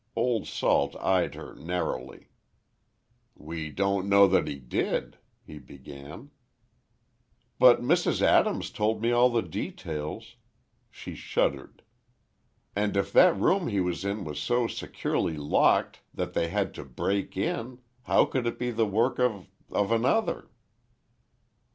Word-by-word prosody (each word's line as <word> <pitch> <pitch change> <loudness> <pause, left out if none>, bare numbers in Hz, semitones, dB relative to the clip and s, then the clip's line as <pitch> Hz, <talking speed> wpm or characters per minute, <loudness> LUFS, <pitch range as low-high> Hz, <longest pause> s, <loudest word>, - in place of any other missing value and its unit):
Old 115 0 0
Salt 70 0 +1
eyed 95 -2 0
her - - -9
narrowly. 80 -7 -5 1.1
"We 80 0 -6
don't 100 +3 -1
know 100 0 +7
that 95 - +2
he - - -3
did," 65 -3 -3 0.3
he 75 - -10
began. 70 +1 -12 1.3
"But - - +6
Mrs. - - +2
Adams - - +2
told 110 +1 0
me 120 - +2
all 120 +1 +5
the 120 -2 0
details"—she 75 -2 -8
shuddered, 70 -1 -2 0.9
"and 105 0 0
if 100 0 -1
that 180 -2 +6
room 190 -2 +2
he 100 -3 -1
was 90 0 -2
in 100 +1 -2
was 75 -1 -5
so 120 0 +1
securely 80 -7 -2
locked 75 0 +2
that - - -3
they 85 - 0
had 100 +3 -1
to - - -8
break 95 +10 -3
in, 130 -7 -2 0.3
how - - +4
could 125 -3 -2
it 120 - -3
be 125 0 -2
the 115 -1 +1
work 115 +7 +1
of—of 100 -3 -2
another?" 130 - +1
100 Hz, 130 wpm, -27 LUFS, 80-115 Hz, 1.3 s, know